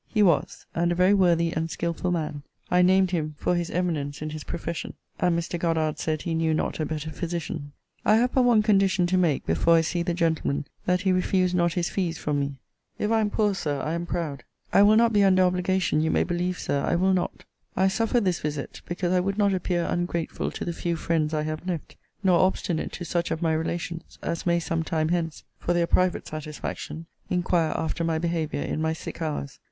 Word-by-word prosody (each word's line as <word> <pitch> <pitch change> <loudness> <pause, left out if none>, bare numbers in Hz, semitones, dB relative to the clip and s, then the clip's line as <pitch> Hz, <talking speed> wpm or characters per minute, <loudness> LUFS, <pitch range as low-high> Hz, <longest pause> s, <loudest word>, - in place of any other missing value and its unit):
He 215 -2 +2
was; 175 -5 +1
and 170 +1 +1
a - - +1
very 185 +3 +4
worthy 170 -4 +3
and 160 0 -2
skilful 170 +2 -2
man. 155 -4 -2 0.3
I 180 0 +5
named 185 0 +4
him 155 -4 -2
for 180 - 0
his 175 -1 -1
eminence 155 -5 -2
in 155 0 -4
his 155 -1 -6
profession: 170 0 -5 0.2
and 180 -3 +2
Mr. 170 +1 -3
Goddard 160 -2 0
said 155 -2 -1
he 170 - -2
knew 160 -1 +1
not - - -2
a 155 - 0
better 155 0 -4
physician. 165 -3 -4 0.3
I 215 - +5
have 245 +2 +2
but 260 - +4
one 240 -4 +4
condition 195 -4 +3
to 180 +1 +1
make 170 -6 +2
before 165 - +3
I 165 - +5
see 170 +2 -1
the 170 0 -1
gentleman; 160 -4 0 0.2
that 180 0 +2
he 195 -1 +2
refuse 185 0 +2
not 170 -1 +2
his 175 -1 -1
fees 175 -4 -1
from 150 -2 -1
me. 140 0 -2 0.4
If 210 - -1
I 225 - +4
am 210 - +1
poor, 210 -1 +1
Sir, 145 -7 -2
I 155 +4 -2
am 170 +1 -3
proud. 160 -6 -3 0.3
I - - +7
will 210 +1 +6
not 230 0 +4
be 205 -1 +5
under 185 -1 +5
obligation, 180 -3 +1
you 160 - +1
may - - +2
believe, 180 +1 -1
Sir, 140 0 -1
I - - +1
will 190 +2 +3
not. 180 -1 -2 0.3
I 190 - +4
suffer 225 +5 +1
this 185 -5 0
visit, 145 -2 -4
because 175 0 -1
I 180 - +4
would 195 +2 -1
not 200 -2 +3
appear 175 -2 0
ungrateful 175 -1 -2
to - - -4
the 170 - -2
few 170 +1 -2
friends 160 -1 0
I 155 -1 0
have 155 +3 -4
left, 170 -4 -4 0.3
nor 180 -3 +4
obstinate 185 -3 0
to 175 - -5
such 170 +1 -1
of 165 - -2
my 160 -1 +2
relations, 170 +1 -4
as 170 +1 -3
may 170 0 +3
some 165 0 -1
time 160 -1 -1
hence, 165 -2 -1 0.2
for 175 - 0
their 170 -1 +3
private 180 +1 +1
satisfaction, 155 +1 -6 0.2
inquire 175 -3 +1
after 160 +1 -2
my 165 -1 +1
behaviour 160 -3 -1
in 155 - -2
my 160 0 +1
sick 160 - -8
hours. 150 -3 -3
170 Hz, 220 wpm, -26 LUFS, 160-185 Hz, 0.4 s, I